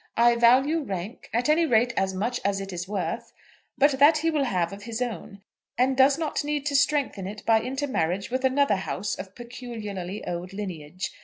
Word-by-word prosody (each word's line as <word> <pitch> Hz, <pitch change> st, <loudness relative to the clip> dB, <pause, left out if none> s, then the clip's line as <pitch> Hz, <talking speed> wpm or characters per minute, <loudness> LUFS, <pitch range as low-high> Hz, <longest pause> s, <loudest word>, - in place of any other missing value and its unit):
I 235 Hz, +1 st, +5 dB
value 260 Hz, +7 st, +4 dB
rank, 200 Hz, -, -6 dB
at 240 Hz, +4 st, 0 dB
any 320 Hz, +2 st, +3 dB
rate, 235 Hz, -1 st, +3 dB
as 190 Hz, 0 st, +1 dB
much 225 Hz, +6 st, -2 dB
as 200 Hz, 0 st, 0 dB
it 195 Hz, -1 st, -6 dB
is 175 Hz, 0 st, -5 dB
worth; 200 Hz, -2 st, -3 dB, 0.4 s
but 285 Hz, +1 st, +5 dB
that 300 Hz, +3 st, +7 dB
he 325 Hz, +2 st, +1 dB
will 295 Hz, -3 st, +1 dB
have 180 Hz, -6 st, -1 dB
of 200 Hz, -, -9 dB
his 230 Hz, -1 st, -4 dB
own, 205 Hz, -4 st, -5 dB, 0.3 s
and 260 Hz, +2 st, +2 dB
does 270 Hz, +2 st, +5 dB
not 315 Hz, -3 st, -2 dB
need 295 Hz, -1 st, -2 dB
to 290 Hz, -1 st, -1 dB
strengthen 280 Hz, -9 st, +1 dB
it 210 Hz, +1 st, -8 dB
by 225 Hz, -1 st, +4 dB
intermarriage 235 Hz, -, -2 dB
with 260 Hz, +1 st, -1 dB
another 265 Hz, -5 st, +3 dB
house 195 Hz, +1 st, -3 dB
of 190 Hz, 0 st, -8 dB
peculiarly 220 Hz, -6 st, -6 dB
old 175 Hz, +2 st, -5 dB
lineage. 185 Hz, -3 st, -5 dB
235 Hz, 190 wpm, -26 LUFS, 195-270 Hz, 0.4 s, that